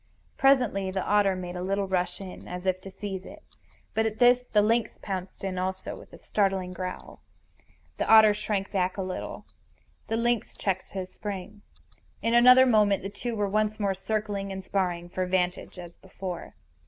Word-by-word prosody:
Presently 245 -8 +3
the 190 0 -2
otter 205 -2 +3
made 180 -1 -6
a 180 - -4
little 195 +2 -1
rush 180 -1 -1
in, 190 -2 -9
as 180 +1 -6
if 185 0 0
to 195 - -9
seize 195 -1 -6
it. 310 +7 -12 0.5
But 220 0 +2
at 220 0 -4
this 245 +1 +6
the 210 -4 +2
lynx 230 +2 +1
pounced 190 -1 -6
in 185 -1 -2
also, 190 +1 -3
with - - -14
a - - -12
startling 195 -3 0
growl. 185 0 -7 0.8
The - - -2
otter 220 -1 +8
shrank 205 -1 -2
back 185 -1 0
a 195 - -1
little. 185 0 -5 0.6
The 225 - -1
lynx 240 0 0
checked 190 -2 -2
his 185 -1 -5
spring. 205 0 -6 0.6
In 230 - 0
another 250 +2 +8
moment 210 -6 +3
the 195 - -3
two 235 +3 -4
were 205 -1 0
once 215 +1 0
more 200 -2 +1
circling 200 0 -3
and 190 0 -5
sparring 180 -3 -1
for 185 +1 -2
vantage 180 0 -1
as 175 -1 -10
before. 180 -2 -7
195 Hz, 180 wpm, -27 LUFS, 185-215 Hz, 0.8 s, otter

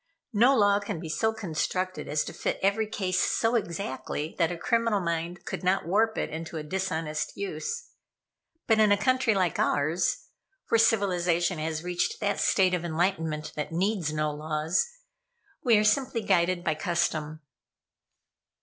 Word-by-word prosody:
No 245 +6 +5
law 205 -1 +4
can 200 -5 -5
be 165 -1 -7
so 220 +8 +1
constructed 185 -2 -3
as 150 +1 0
to - - -7
fit - - -2
every 205 +3 +2
case 185 -4 -1
so 225 +1 +1
exactly 165 - -3
that 165 -1 +3
a 175 - -4
criminal 230 +2 +1
mind 170 0 -3
could - - -5
not 185 0 +1
warp 220 +5 +2
it - - -2
into 160 +1 -5
a 155 - -4
dishonest 160 -3 -3
use. 200 - -4 0.8
But 225 -1 +3
in 215 -1 +5
a 205 - +5
country 255 +1 +2
like 185 -4 0
ours, 170 - +1 0.4
where 230 - +4
civilization 180 -6 +2
has 155 0 -3
reached 180 - -1
that - - 0
state 185 -2 +3
of 180 -2 0
enlightenment 160 -3 -1
that 150 - -4
needs 180 -2 0
no 155 0 0
laws, 155 - 0 0.8
we 235 -4 +5
are 210 - +3
simply 240 +2 +1
guided 175 -3 +2
by 155 - +1
custom." 155 -1 -1
180 Hz, 160 wpm, -27 LUFS, 160-210 Hz, 0.8 s, No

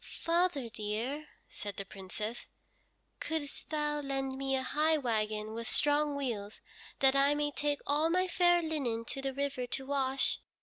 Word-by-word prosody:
"Father, 335 -6 +2
dear," 230 +7 -3 0.2
said 205 -1 -6
the 200 - -3
Princess, 205 +4 -5 0.7
"couldst 315 -3 -4
thou 295 -1 0
lend 270 -2 -2
me 270 0 0
a 260 - 0
high 310 +4 +3
wagon 215 -4 -1
with 230 0 -4
strong 295 0 +3
wheels, 225 -7 -3 0.4
that 270 0 +6
I 280 +1 +5
may 295 0 0
take 290 0 0
all 300 +3 +2
my 365 +2 +2
fair 350 -1 +4
linen 260 -8 -1
to 270 - -4
the 270 0 -1
river 270 -2 -2
to 265 - -4
wash. 270 -1 +1
275 Hz, 160 wpm, -32 LUFS, 235-295 Hz, 0.7 s, that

